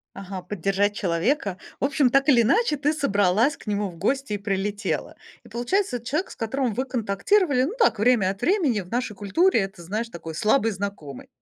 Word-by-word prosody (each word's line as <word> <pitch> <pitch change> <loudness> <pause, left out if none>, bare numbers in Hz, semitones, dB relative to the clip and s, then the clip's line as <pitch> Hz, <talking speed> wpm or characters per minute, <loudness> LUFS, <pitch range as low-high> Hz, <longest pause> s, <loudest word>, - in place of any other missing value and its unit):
Ага, 190 -1 -7
поддержать 200 +2 0
человека. 195 - 0 0.2
В - - -2
общем, 275 -2 +2
так 275 +3 +2
или 240 -4 +6
иначе, 355 - +2
ты 295 +2 +1
собралась 210 -2 +2
к - - -17
нему 205 0 -1
в 175 - -11
гости 260 +7 -1
и 205 - -1
прилетела. 200 0 -2 0.3
И - - -15
получается, 250 - -1
эт 235 - -19
человек, 305 +10 -2
с - - -13
которым 240 0 -1
вы 255 +5 -1
контактировали, 255 - +1
ну 295 - -1
так, 230 - +3
время 220 -4 +3
от 195 +1 -6
времени. 325 - +2
В 180 -1 -11
нашей 240 -2 -2
культуре 225 - +2
это, 195 -2 -5
знаешь, 215 +7 -3
такой 165 -5 -8
слабый 220 - +2
знакомый. 190 -9 -6
220 Hz, 195 wpm, -24 LUFS, 195-275 Hz, 0.3 s, или